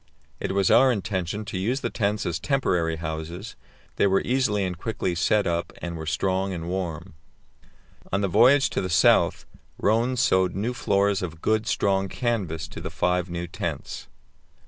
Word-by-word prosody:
It - - -2
was 100 -1 +2
our 130 0 +6
intention 100 -1 -2
to 100 -3 -4
use 120 +8 -1
the - - -2
tents 105 -1 -1
as 85 -1 -2
temporary 90 - 0
houses; 80 +1 -6 0.4
they - - +4
were 95 0 +3
easily 120 -6 +1
and 90 -1 -3
quickly 95 -1 -2
set 100 +4 +2
up, 85 0 -1
and 85 -1 -5
were 80 -1 -6
strong 95 +3 0
and 85 -1 -5
warm. 90 -1 -4 1.0
On 100 - +1
the 100 - +1
voyage 125 +9 +5
to - - -1
the 95 - -3
South 80 - +3 0.3
Rönne 115 +5 +2
sewed 95 -7 +2
new 110 +6 -1
floors 100 -4 +1
of 80 -3 -5
good, 110 +4 0
strong 95 -1 +1
canvas 95 -10 -2
to - - -8
the - - -4
five 90 0 0
new 85 0 -4
tents. 85 - -5
95 Hz, 170 wpm, -25 LUFS, 85-105 Hz, 1.0 s, our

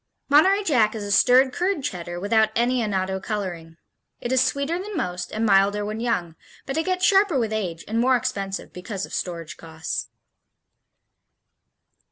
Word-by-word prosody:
Monterey 380 +8 +5
Jack 230 - +2
is 215 - -4
a 205 - -4
stirred 255 +5 +5
curd 365 -4 -1
Cheddar 175 -4 -4
without 220 +3 +2
any 245 +2 +2
annatto 190 -3 -1
coloring. 180 -6 -5 0.4
It 240 - -4
is 260 -1 +4
sweeter 280 +6 0
than 400 0 -6
most 180 - -3
and 220 +1 -1
milder 205 0 +3
when 215 +1 -4
young, 180 -9 -1 0.3
but 270 - -4
it 320 +3 -1
gets 370 -1 +1
sharper 390 -4 +4
with 225 -3 -1
age 180 -7 -3
and 225 +2 -1
more 255 +2 +4
expensive 195 -5 -3
because 190 +2 -5
of - - -14
storage 170 -3 -5
costs. 160 -1 -5
220 Hz, 165 wpm, -24 LUFS, 190-265 Hz, 0.4 s, Monterey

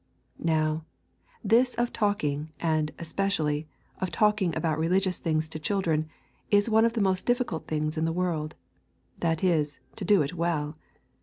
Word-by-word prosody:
Now, 155 -1 +1 0.6
this 235 +4 +4
of 240 0 0
talking, 160 -9 0
and, 155 -2 +1
especially, 160 -4 -1 0.3
of 185 - -1
talking 210 -5 +2
about 160 -2 0
religious 180 +3 +1
things 155 -1 0
to 160 - -6
children, 160 -3 0 0.4
is 205 +2 +3
one 220 +1 +5
of 230 - +1
the 230 - 0
most 185 -1 0
difficult 245 -9 0
things 155 +1 -1
in 160 - +1
the 165 - +1
world, 165 -3 -1 0.6
that 165 -1 0
is, 155 -5 +1 0.2
to - - -4
do 205 -6 +4
it 140 - -4
well. 165 -3 -1
165 Hz, 155 wpm, -28 LUFS, 155-200 Hz, 0.6 s, one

